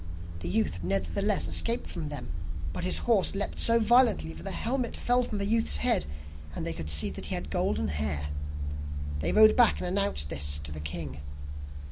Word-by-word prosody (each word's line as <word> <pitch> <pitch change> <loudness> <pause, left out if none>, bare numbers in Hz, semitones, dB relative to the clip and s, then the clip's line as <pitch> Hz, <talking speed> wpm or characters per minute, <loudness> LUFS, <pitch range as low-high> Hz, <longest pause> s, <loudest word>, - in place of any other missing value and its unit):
The 85 0 -4
youth 90 -4 0
nevertheless 85 -3 0
escaped 230 - +1
from 165 -4 -5
them, 145 - -6 0.4
but - - -3
his 185 - +1
horse 215 -5 +3
leapt 200 - -1
so 230 0 +4
violently 230 - +4
that 80 - -11
the - - -5
helmet 245 0 -2
fell 245 +1 +2
from 215 - -4
the 200 - -1
youth's 225 +2 +2
head, 235 -5 +1 0.5
and - - -4
they 85 - -2
could 80 -1 -6
see 75 -1 +2
that - - -5
he - - -2
had - - -6
golden 70 +1 0
hair. 75 0 -2 0.9
They 75 - 0
rode 215 0 +7
back 240 -3 +5
and - - -4
announced 180 - 0
this 70 +1 +1
to 75 - -3
the 75 - -6
king. 75 -2 -5
90 Hz, 190 wpm, -28 LUFS, -, 0.9 s, rode